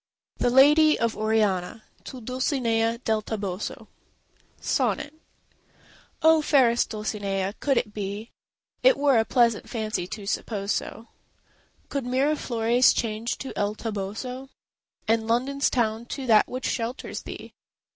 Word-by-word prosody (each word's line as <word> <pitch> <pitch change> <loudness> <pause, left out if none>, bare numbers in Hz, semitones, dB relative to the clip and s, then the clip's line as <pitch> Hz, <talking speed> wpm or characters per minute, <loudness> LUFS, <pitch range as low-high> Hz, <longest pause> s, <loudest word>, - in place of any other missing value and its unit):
THE - - +2
LADY 295 +5 +6
OF 230 -1 0
ORIANA 215 -2 0 0.2
To 255 - -8
Dulcinea 235 -2 0
del 220 -1 +1
Toboso 205 -3 -5 0.7
SONNET 290 - -1 1.1
Oh, 320 0 +6
fairest 255 -6 +3
Dulcinea, 200 -3 -3
could 275 -2 +1
it 210 - -1
be! 205 +2 -5 0.5
It - - +5
were 280 -4 +4
a 220 - +1
pleasant 235 -2 +2
fancy 215 -6 -3
to 205 +1 -7
suppose 200 0 -2
so— 230 - -4 0.8
Could 280 -3 -3
Miraflores 250 -3 +2
change 225 +1 -2
to 270 - -7
El 205 +1 -1
Toboso, 225 +5 -5 0.6
And 220 0 +1
London's 265 +5 +1
town 230 -1 -1
to 270 0 -5
that 220 -3 +5
which 255 0 -5
shelters 235 +3 -3
thee! - - -9
230 Hz, 125 wpm, -25 LUFS, 215-260 Hz, 1.1 s, LADY